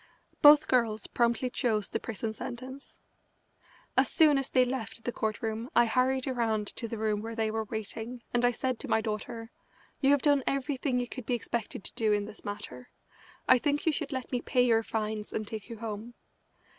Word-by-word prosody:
Both 300 Hz, +1 st, +8 dB
girls 225 Hz, -4 st, +1 dB
promptly 235 Hz, +1 st, +1 dB
chose 215 Hz, -5 st, 0 dB
the 225 Hz, -, -2 dB
prison 225 Hz, -1 st, -4 dB
sentence. 255 Hz, +4 st, -8 dB, 1.0 s
As -, -, +5 dB
soon 300 Hz, -4 st, +5 dB
as 270 Hz, -, -3 dB
they 255 Hz, -1 st, +4 dB
left 230 Hz, -3 st, -4 dB
the 245 Hz, -, -1 dB
court 220 Hz, -1 st, -3 dB
room 225 Hz, +2 st, -3 dB
I 240 Hz, -, +6 dB
hurried 255 Hz, +2 st, +1 dB
around 230 Hz, -5 st, 0 dB
to 230 Hz, -, -3 dB
the 230 Hz, -, -5 dB
room 215 Hz, -1 st, 0 dB
where 225 Hz, +1 st, -5 dB
they 220 Hz, -1 st, 0 dB
were 220 Hz, 0 st, -2 dB
waiting, 225 Hz, +3 st, -5 dB
and 240 Hz, 0 st, +2 dB
I 245 Hz, -, +6 dB
said 250 Hz, 0 st, -2 dB
to -, -, -6 dB
my -, -, +3 dB
daughter: 225 Hz, +2 st, -4 dB, 0.5 s
"You 270 Hz, -, +3 dB
have 285 Hz, -1 st, +4 dB
done 285 Hz, -3 st, +4 dB
everything 275 Hz, -1 st, 0 dB
you 245 Hz, -, -2 dB
could 255 Hz, -2 st, -7 dB
be 245 Hz, -, +2 dB
expected 235 Hz, -4 st, -4 dB
to -, -, -6 dB
do 220 Hz, -2 st, +1 dB
in 205 Hz, 0 st, 0 dB
this 215 Hz, 0 st, -11 dB
matter. 210 Hz, +4 st, -7 dB, 0.6 s
I 255 Hz, -, +7 dB
think 290 Hz, +2 st, 0 dB
you 325 Hz, -, +4 dB
should 300 Hz, -1 st, -3 dB
let 260 Hz, -2 st, -4 dB
me 250 Hz, -2 st, 0 dB
pay 250 Hz, -2 st, +2 dB
your 225 Hz, -2 st, +4 dB
fines 215 Hz, -1 st, -3 dB
and 215 Hz, -1 st, -3 dB
take 220 Hz, 0 st, -7 dB
you 230 Hz, -, -7 dB
home." 225 Hz, +1 st, -6 dB
235 Hz, 205 wpm, -30 LUFS, 220-255 Hz, 1.0 s, Both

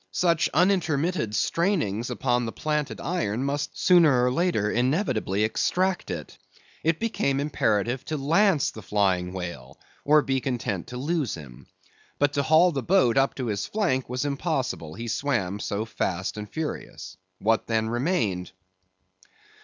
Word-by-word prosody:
Such 170 Hz, -, +2 dB
unintermitted 170 Hz, -, +1 dB
strainings 120 Hz, -, 0 dB
upon 120 Hz, -2 st, 0 dB
the -, -, -3 dB
planted 150 Hz, +1 st, -2 dB
iron 135 Hz, -, -1 dB
must 145 Hz, +1 st, -3 dB
sooner 155 Hz, -9 st, +5 dB
or 125 Hz, -, +2 dB
later 150 Hz, -, +1 dB
inevitably 120 Hz, -, 0 dB
extract 185 Hz, -, 0 dB
it. 85 Hz, -4 st, -6 dB, 0.4 s
It 165 Hz, 0 st, +2 dB
became 150 Hz, -11 st, 0 dB
imperative 125 Hz, -3 st, 0 dB
to 155 Hz, -, -3 dB
lance 160 Hz, +3 st, +3 dB
the 110 Hz, -, -10 dB
flying 95 Hz, -3 st, 0 dB
whale, 85 Hz, -8 st, -7 dB, 0.2 s
or 150 Hz, +1 st, +5 dB
be 135 Hz, -1 st, 0 dB
content 120 Hz, -8 st, -3 dB
to 125 Hz, -, -7 dB
lose 145 Hz, -, -1 dB
him. 70 Hz, -7 st, -12 dB, 0.5 s
But 145 Hz, 0 st, +2 dB
to 140 Hz, -, +1 dB
haul 160 Hz, +5 st, +5 dB
the 140 Hz, -4 st, -2 dB
boat 130 Hz, -5 st, +3 dB
up 135 Hz, 0 st, +2 dB
to 130 Hz, -, -3 dB
his 100 Hz, -4 st, -2 dB
flank 170 Hz, -, 0 dB
was 125 Hz, +3 st, -2 dB
impossible, 110 Hz, -, -2 dB
he 115 Hz, +1 st, -6 dB
swam 105 Hz, -7 st, -1 dB
so 105 Hz, +1 st, -2 dB
fast 95 Hz, -4 st, -2 dB
and 105 Hz, -1 st, -7 dB
furious. 95 Hz, -11 st, -5 dB, 0.2 s
What 110 Hz, +3 st, +1 dB
then 110 Hz, -1 st, +1 dB
remained? 115 Hz, -, -1 dB
130 Hz, 145 wpm, -26 LUFS, 105-155 Hz, 0.5 s, sooner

